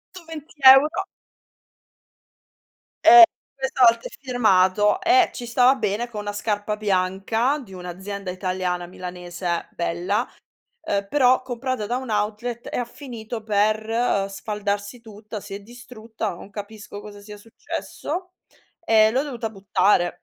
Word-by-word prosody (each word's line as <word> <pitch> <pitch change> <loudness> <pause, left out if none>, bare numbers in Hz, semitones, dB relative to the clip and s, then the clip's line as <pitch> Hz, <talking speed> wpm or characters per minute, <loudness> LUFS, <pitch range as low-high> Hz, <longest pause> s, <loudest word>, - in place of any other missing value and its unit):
Ntoventi 325 -3 -10 0.2
euro. 275 +3 +6 2.2
Eh 355 +1 +11 0.3
questa 265 -1 0
volta 230 0 +3
è - - -11
firmato 210 - +3
e 370 +1 +4
ci 245 - -6
stava 250 +3 +4
bene 225 0 -2
con 210 -2 -6
na' 205 0 -4
scarpa 210 0 -2
bianca 210 +7 0
di 195 - -16
un'azienda 185 +2 -6
italiana 185 -1 -3
milanese 180 -1 -5
bella, 175 +7 -1 0.5
uhm, 200 -10 -2
però 255 -3 +4
comprata 255 -3 -4
da 245 +2 -1
un 255 -4 -6
outlet 215 +3 -2
e - - -2
ha 245 - -1
finito 235 -4 -8
per 215 0 +1
sfaldarsi 205 +3 -4
tutta, 215 -1 -9
si 200 0 -8
è - - -7
distrutta, 225 -3 -7
non 195 - -12
capisco 205 0 -8
cosa 205 -1 -11
sia 210 0 -11
successo 325 - -6 0.5
e 220 -7 +4
l'ho 260 +5 0
dovuta 240 -6 -5
buttare. 195 -3 +1
215 Hz, 130 wpm, -23 LUFS, 200-245 Hz, 2.2 s, Eh